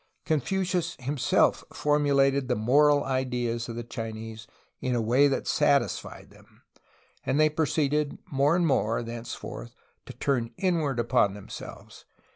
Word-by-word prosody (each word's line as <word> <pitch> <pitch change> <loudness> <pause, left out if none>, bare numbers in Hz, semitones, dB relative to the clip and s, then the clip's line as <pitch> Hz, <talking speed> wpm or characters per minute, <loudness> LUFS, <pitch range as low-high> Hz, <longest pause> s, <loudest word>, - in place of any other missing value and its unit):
Confucius 175 +3 -1
himself 130 0 +1
formulated 140 -2 +2
the 125 - +1
moral 145 +6 +4
ideas 125 -3 -2
of 115 - -5
the 120 - -4
Chinese 110 -1 -7 0.3
in 125 -1 -1
a - - +1
way 125 +6 +4
that 135 - -1
satisfied - - 0
them, - - -21 0.6
and 140 - 0
they 155 0 +5
proceeded 150 -1 0
more 140 +3 +3
and 175 -1 +2
more, 120 -6 +1
thenceforth, 115 +1 -7 0.3
to - - -8
turn 120 -4 -1
inward 160 -9 0
upon 105 -4 +2
them 105 - -12
selves. - - -10
135 Hz, 135 wpm, -27 LUFS, 120-150 Hz, 0.6 s, they